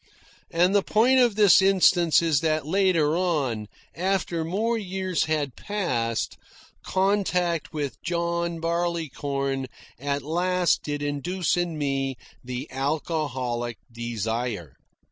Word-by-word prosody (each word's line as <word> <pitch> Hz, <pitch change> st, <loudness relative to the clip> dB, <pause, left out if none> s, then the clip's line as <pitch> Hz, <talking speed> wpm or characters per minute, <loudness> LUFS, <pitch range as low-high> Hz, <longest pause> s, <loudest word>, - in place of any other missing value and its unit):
And 175 Hz, +3 st, +3 dB
the 205 Hz, -, +5 dB
point 240 Hz, +7 st, +3 dB
of 240 Hz, -5 st, +4 dB
this 205 Hz, -3 st, +6 dB
instance 180 Hz, -4 st, +4 dB
is 160 Hz, -4 st, +3 dB
that 155 Hz, -2 st, 0 dB
later 165 Hz, -3 st, +2 dB
on, 140 Hz, -, 0 dB, 0.3 s
after 180 Hz, -2 st, 0 dB
more 210 Hz, +8 st, 0 dB
years 190 Hz, -4 st, -1 dB
had 150 Hz, -5 st, -1 dB
passed, 125 Hz, -, -2 dB, 0.5 s
contact 185 Hz, -4 st, 0 dB
with 145 Hz, -3 st, -4 dB
John 170 Hz, -1 st, -1 dB
Barleycorn 145 Hz, -5 st, -2 dB, 0.3 s
at 140 Hz, +1 st, -2 dB
last 175 Hz, +3 st, +1 dB
did 145 Hz, -1 st, -4 dB
induce 150 Hz, +4 st, -1 dB
in 175 Hz, -2 st, -1 dB
me 135 Hz, -2 st, -1 dB, 0.3 s
the 125 Hz, 0 st, -5 dB
alcoholic 130 Hz, -5 st, -2 dB
desire. 115 Hz, -, -3 dB
165 Hz, 110 wpm, -25 LUFS, 135-180 Hz, 0.5 s, this